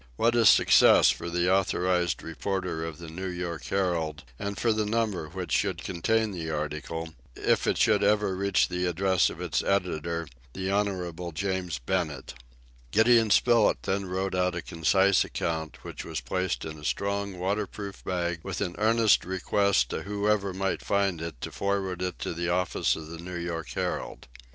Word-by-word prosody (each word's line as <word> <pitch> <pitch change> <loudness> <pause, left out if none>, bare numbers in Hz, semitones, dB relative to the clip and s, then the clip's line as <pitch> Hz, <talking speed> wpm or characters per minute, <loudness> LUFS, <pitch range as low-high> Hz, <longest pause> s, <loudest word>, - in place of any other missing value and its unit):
What 115 - +2
a 115 -2 +5
success - - +7
for - - -5
the 90 +2 +2
authorized 90 -2 +1
reporter 90 0 -3
of 80 -2 -5
the 85 - -9
New 90 +4 -5
York 85 -5 -4
Herald, 85 -6 -1 0.2
and 100 -1 -4
for 115 +2 +2
the 110 0 0
number 105 -7 -1
which - - -6
should - - 0
contain 110 +5 0
the 85 -4 -5
article, 80 +1 -4 0.2
if - - +1
it - - +2
should 105 - +3
ever 105 -2 +2
reach 100 0 +2
the 90 0 -1
address 95 +1 +2
of - - -9
its - - -1
editor, 85 -4 -1 0.3
the 95 0 -3
Honorable 90 -4 -2
James 90 0 -2
Bennett! 75 +1 -2 0.6
Gideon 110 - +4
Spilett 115 +1 +4
then 95 0 -1
wrote 95 +1 -2
out 90 0 +1
a - - -4
concise 95 +4 +3
account, 80 -1 -4
which - - -7
was - - -4
placed 90 +9 -2
in 80 -1 -7
a - - -13
strong 100 +3 -2
waterproof 100 +1 -3
bag, 85 -2 -2
with - - -5
an 90 -4 -2
earnest 110 0 +4
request 95 -5 +1
to - - -3
whoever 105 0 0
might 95 +1 -2
find 100 -4 0
it 80 -7 -6
to - - -5
forward 95 -2 -2
it 90 0 -2
to - - -4
the 85 +1 -2
office 90 +1 +1
of 80 - -7
the 85 0 -8
New 90 +1 -6
York 85 -1 -4
Herald. - - -4
90 Hz, 175 wpm, -27 LUFS, 85-100 Hz, 0.6 s, success